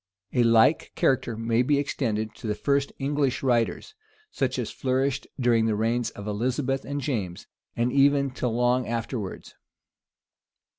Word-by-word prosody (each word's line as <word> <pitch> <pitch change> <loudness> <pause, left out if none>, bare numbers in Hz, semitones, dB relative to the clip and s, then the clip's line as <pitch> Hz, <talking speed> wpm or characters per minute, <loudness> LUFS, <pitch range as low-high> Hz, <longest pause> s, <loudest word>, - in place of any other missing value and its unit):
A 125 - +3
like 115 +6 +4
character 120 -4 +1
may 115 +1 +1
be 140 +3 +2
extended 110 -6 -2
to - - -8
the 105 - 0
first 140 +5 0
English 140 -2 0
writers; 120 - 0 0.4
such - - -1
as - - -3
flourished 135 0 -1
during 115 -3 +3
the 110 - +1
reigns 115 +2 0
of 100 - -10
Elizabeth 130 +5 -1
and 145 +1 -3
James, 105 -11 -3 0.3
and 120 +1 0
even 140 0 +4
till 125 -2 -2
long 125 +2 +1
afterwards. 115 -3 -4
125 Hz, 145 wpm, -26 LUFS, 115-135 Hz, 0.4 s, like